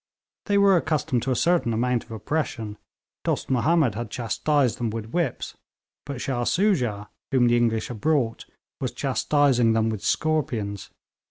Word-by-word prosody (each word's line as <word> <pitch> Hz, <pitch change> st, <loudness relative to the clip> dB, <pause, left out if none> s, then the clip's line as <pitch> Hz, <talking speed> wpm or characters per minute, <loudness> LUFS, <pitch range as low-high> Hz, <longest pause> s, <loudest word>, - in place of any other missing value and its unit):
They 205 Hz, -, +3 dB
were 200 Hz, -1 st, +5 dB
accustomed 150 Hz, -6 st, 0 dB
to 135 Hz, -, -2 dB
a -, -, +2 dB
certain 165 Hz, -4 st, +2 dB
amount 125 Hz, +1 st, 0 dB
of -, -, -27 dB
oppression; 110 Hz, -3 st, -3 dB, 0.4 s
Dost -, -, -1 dB
Mahomed 140 Hz, 0 st, +3 dB
had 115 Hz, +1 st, -5 dB
chastised 125 Hz, +2 st, 0 dB
them 120 Hz, -2 st, -1 dB
with 110 Hz, 0 st, -6 dB
whips, 175 Hz, +1 st, -2 dB, 0.5 s
but 140 Hz, -3 st, -5 dB
Shah 125 Hz, -2 st, -2 dB
Soojah, 125 Hz, -, +1 dB, 0.2 s
whom 130 Hz, -3 st, +4 dB
the 120 Hz, 0 st, +4 dB
English 115 Hz, -2 st, +1 dB
had 115 Hz, -4 st, -7 dB
brought, 140 Hz, -8 st, 0 dB, 0.3 s
was -, -, -3 dB
chastising 135 Hz, -6 st, +2 dB
them 110 Hz, 0 st, +1 dB
with 110 Hz, -3 st, -5 dB
scorpions. 120 Hz, -11 st, -1 dB
125 Hz, 155 wpm, -25 LUFS, 115-155 Hz, 0.5 s, were